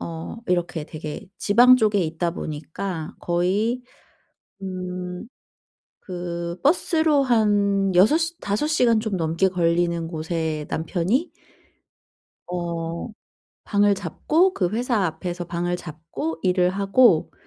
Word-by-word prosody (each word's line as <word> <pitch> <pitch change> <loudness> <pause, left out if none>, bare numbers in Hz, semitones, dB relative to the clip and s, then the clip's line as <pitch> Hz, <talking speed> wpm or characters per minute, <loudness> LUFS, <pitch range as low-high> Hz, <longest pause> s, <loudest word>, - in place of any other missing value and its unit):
어 165 +5 -6
이렇게 175 -3 -1
되게 155 0 -7
지방 245 +5 +6
쪽에 210 -3 +2
있다 165 0 -1
보니까 160 +2 -5
거의 195 +8 0 0.8
음 180 +1 -5 0.8
그 175 -1 -5
버스로 315 -1 +3
한 205 -5 +2
6 210 - +6
시 330 +1 -2
5 205 +9 -1
시간 245 -7 +3
좀 215 -4 -2
넘게 165 +3 +1
걸리는 170 -1 +1
곳에 160 -2 -3
남편이 185 - -1 1.2
어 170 0 -4 0.6
방을 205 -1 +3
잡고 305 - +1
그 180 - +1
회사 230 -2 0
앞에서 175 +2 -3
방을 175 +1 -2
잡고 160 0 -6
일을 180 -1 +3
하고 195 -1 +3
180 Hz, 190 characters per minute, -23 LUFS, 170-215 Hz, 1.2 s, 지방